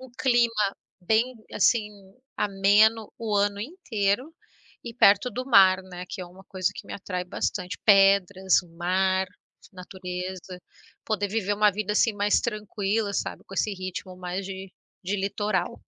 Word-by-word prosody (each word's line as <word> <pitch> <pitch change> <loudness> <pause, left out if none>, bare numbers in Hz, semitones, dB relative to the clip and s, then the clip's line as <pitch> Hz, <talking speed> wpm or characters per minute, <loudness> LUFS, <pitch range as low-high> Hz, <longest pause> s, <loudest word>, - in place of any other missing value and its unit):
Um 260 -1 -12
clima 235 -5 +2 0.2
bem, 220 +7 +1 0.2
assim, 215 +1 +2 0.5
ameno 210 +2 +3
o 220 -3 -1
ano 200 0 +1
inteiro, 250 - -2 0.5
e 235 - -6
perto 210 +1 +5
do 255 +1 -4
mar, 190 -6 +6
né, 180 -1 -8
que 190 - -6
é 180 - -6
uma 185 +2 -15
coisa 185 -2 -1
que - - -9
me - - -8
atrai 180 -2 -4
bastante 180 +1 -3
pedras, 195 -2 +4
o - - -18
mar, 190 +2 +1 0.5
natureza. 180 0 -7 0.4
Poder 205 -2 -1
viver 205 -1 -1
uma 210 0 +4
vida 210 +1 -2
assim, 225 +2 +3
mais 205 0 +2
tranquila, 210 -1 -2
sabe, - - -3
com 195 - -11
esse 210 +2 0
ritmo 185 -1 -6
mais 180 +1 -5
de 190 -1 -8 0.3
de 195 +3 -1
litoral. 200 +1 -2
200 Hz, 150 wpm, -26 LUFS, 185-215 Hz, 0.5 s, mar